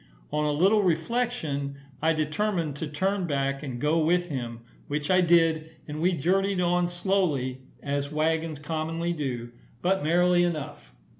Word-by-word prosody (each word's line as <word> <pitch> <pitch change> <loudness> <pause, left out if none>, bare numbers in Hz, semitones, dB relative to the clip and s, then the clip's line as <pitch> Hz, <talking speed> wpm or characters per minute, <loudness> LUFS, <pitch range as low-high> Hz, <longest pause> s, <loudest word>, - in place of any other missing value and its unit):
On 150 0 0
a 150 - +2
little 190 +8 +4
reflection, 165 - -1 0.3
I 160 +1 +3
determined 155 0 -1
to 160 - -3
turn 190 +5 -1
back 140 -2 -1
and 130 -5 -5
go 150 +4 +2
with 175 +2 +2
him, 120 -5 -4 0.3
which 150 +3 -2
I 185 0 +5
did; 165 -2 +3 0.2
and 150 +1 -5
we 180 +2 +3
journeyed 190 +5 +1
on 175 0 +2
slowly 175 -9 0 0.2
as 140 0 -2
waggons 160 0 0
commonly 160 +3 -2
do, 125 -6 -4 0.3
but 190 -2 +2
merrily 175 +2 +4
enough. 150 - -4
160 Hz, 150 wpm, -27 LUFS, 145-180 Hz, 0.3 s, I